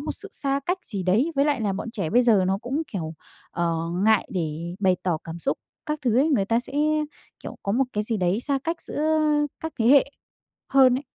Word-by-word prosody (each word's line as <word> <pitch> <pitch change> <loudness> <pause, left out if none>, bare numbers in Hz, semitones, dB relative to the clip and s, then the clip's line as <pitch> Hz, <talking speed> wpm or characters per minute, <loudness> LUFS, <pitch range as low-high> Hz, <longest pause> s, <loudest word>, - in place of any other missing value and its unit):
một - - -3
sự 410 - -8
xa 275 0 -1
cách 365 +2 0
gì 200 -4 -4
đấy. 220 - +2
Với 280 +1 +3
lại 285 -5 +1
là 205 -3 0
bọn 205 +4 -4
trẻ 195 -9 -3
bây 245 +2 +5
giờ 215 -6 +4
nó 195 +1 +1
cũng, 270 +8 -2
kiểu, 165 -4 -4 0.4
ờ, 170 -1 0 0.3
ngại 220 -1 +4
để 170 0 -3
bày 185 -2 +3
tỏ 170 -4 0
cảm 165 0 -7
xúc 275 +11 -1 0.3
các 300 0 -2
thứ 240 -2 +2
ấy, 295 +4 +4
người 245 -10 +2
ta 230 +3 +1
sẽ, 260 - -12 0.7
kiểu, - - -7
có 200 - -1
một 265 +4 +3
cái 210 - 0
gì 225 0 -1
đấy 185 +3 +1
xa 275 +1 0
cách 330 +1 -2
giữa 315 +1 0 0.4
các 320 0 -4
thế 225 - +2
hệ 275 +1 +7 0.6
hơn 260 -2 +5
ấy. - - -8
230 Hz, 230 wpm, -25 LUFS, 185-275 Hz, 0.7 s, hệ